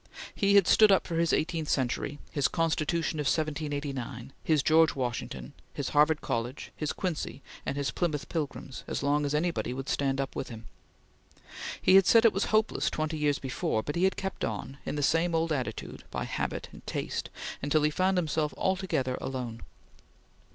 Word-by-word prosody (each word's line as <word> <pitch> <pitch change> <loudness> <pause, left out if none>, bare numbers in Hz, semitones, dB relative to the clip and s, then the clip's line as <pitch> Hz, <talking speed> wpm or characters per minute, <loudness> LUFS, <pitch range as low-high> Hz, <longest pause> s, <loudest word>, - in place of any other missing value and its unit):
He 200 0 +3
had 200 -3 +7
stood 215 +3 +6
up 195 - +4
for 165 - -3
his 165 0 +2
eighteenth 160 -1 0
century, 135 +2 0
his 140 -3 +2
Constitution 165 0 0
of 145 - 0
1789, 145 -5 -2
his 155 -3 +2
George 160 +1 +5
Washington, 120 - -4 0.2
his - - -2
Harvard 150 +1 +4
College, 120 +3 -3
his 150 - -2
Quincy, 160 -6 -3 0.2
and 140 - -1
his 140 -1 0
Plymouth 155 -5 -1
Pilgrims, 145 -4 -4
as - - -3
long 145 +1 +2
as 145 - -1
any 170 +3 +2
one 125 - -3
would 135 +1 -5
stand 135 -1 0
up 135 -1 -2
with 130 - -4
him. 115 -2 -9 1.1
He - - +4
had 195 - +5
said 230 0 +6
it 225 - +6
was 195 - +1
hopeless 215 +1 +2
twenty 155 0 -2
years 145 -1 +2
before, 120 -4 -1
but 145 - -3
he 175 +2 +3
had 190 - +1
kept 190 0 -4
on, 135 +2 -4
in - - -2
the 145 - -1
same 165 +4 +2
old 165 0 +1
attitude, 125 -7 -3
by - - -3
habit - - -3
and - - -13
taste, - - -3 0.3
until 145 +2 +2
he 150 - +3
found 185 +4 +2
himself 155 -3 0
altogether 185 -10 0
alone. 125 -4 -4
150 Hz, 185 wpm, -29 LUFS, 135-165 Hz, 1.1 s, had